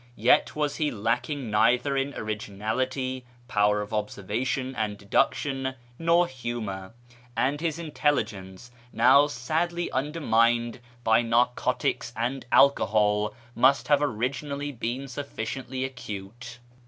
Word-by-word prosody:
Yet -, -, +3 dB
was 150 Hz, -1 st, -1 dB
he 150 Hz, -2 st, +1 dB
lacking 120 Hz, +3 st, -2 dB
neither 120 Hz, +6 st, +3 dB
in 135 Hz, +1 st, -1 dB
originality, 110 Hz, +5 st, -3 dB, 0.2 s
power 105 Hz, -2 st, +2 dB
of 105 Hz, +2 st, -7 dB
observation 110 Hz, +5 st, -2 dB
and 105 Hz, -1 st, -2 dB
deduction, 130 Hz, +6 st, 0 dB, 0.2 s
nor 170 Hz, +1 st, +4 dB
humour; 115 Hz, -, -5 dB, 0.4 s
and 140 Hz, +3 st, +1 dB
his 165 Hz, -2 st, -1 dB
intelligence, 120 Hz, -, -2 dB, 0.2 s
now 130 Hz, +5 st, +6 dB
sadly 160 Hz, +6 st, -2 dB
undermined 120 Hz, -5 st, +1 dB, 0.2 s
by 110 Hz, 0 st, +4 dB
narcotics 120 Hz, +1 st, 0 dB
and 125 Hz, +4 st, -2 dB
alcohol, 105 Hz, -5 st, +3 dB, 0.2 s
must 135 Hz, +5 st, +3 dB
have 145 Hz, -1 st, +5 dB
originally 140 Hz, +3 st, -2 dB
been 125 Hz, +2 st, -4 dB
sufficiently 130 Hz, -1 st, -4 dB
acute. 120 Hz, -1 st, -8 dB
125 Hz, 105 wpm, -27 LUFS, 110-140 Hz, 0.4 s, now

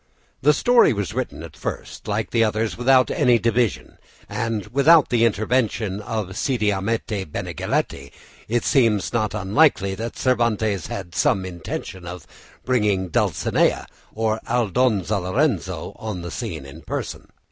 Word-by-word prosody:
The 150 Hz, -, +5 dB
story 240 Hz, -, +4 dB
was 100 Hz, -1 st, -3 dB
written 125 Hz, -9 st, -4 dB
at 85 Hz, -, -10 dB
first, -, -, -6 dB
like 105 Hz, +1 st, -2 dB
the 115 Hz, -1 st, +3 dB
others, 110 Hz, 0 st, 0 dB
without 130 Hz, +1 st, +4 dB
any 120 Hz, -1 st, +4 dB
division 115 Hz, -1 st, -1 dB, 0.3 s
and 115 Hz, -4 st, -2 dB
without 150 Hz, +3 st, +6 dB
the 115 Hz, -1 st, +3 dB
intervention 110 Hz, -2 st, 0 dB
of 105 Hz, -3 st, -4 dB
Cide 130 Hz, -4 st, -1 dB
Hamete 105 Hz, 0 st, 0 dB
Benengeli; 70 Hz, -, -2 dB
and 70 Hz, -, -16 dB, 0.4 s
it 120 Hz, +2 st, 0 dB
seems 110 Hz, -, +2 dB
not 110 Hz, -3 st, 0 dB
unlikely 100 Hz, 0 st, +2 dB
that 115 Hz, +4 st, -5 dB
Cervantes 110 Hz, -, +1 dB
had 95 Hz, -3 st, -6 dB
some 95 Hz, +2 st, +1 dB
intention 90 Hz, +1 st, -6 dB
of 90 Hz, 0 st, -8 dB, 0.4 s
bringing 105 Hz, -7 st, +1 dB
Dulcinea, -, -, +1 dB, 0.3 s
or 110 Hz, 0 st, -1 dB
Aldonza 110 Hz, -3 st, +1 dB
Lorenzo, 95 Hz, -, -1 dB
on 105 Hz, -6 st, -5 dB
the 85 Hz, -, -6 dB
scene 85 Hz, -, -5 dB
in 70 Hz, -, -11 dB
person. -, -, -5 dB
110 Hz, 140 wpm, -22 LUFS, 95-120 Hz, 0.4 s, without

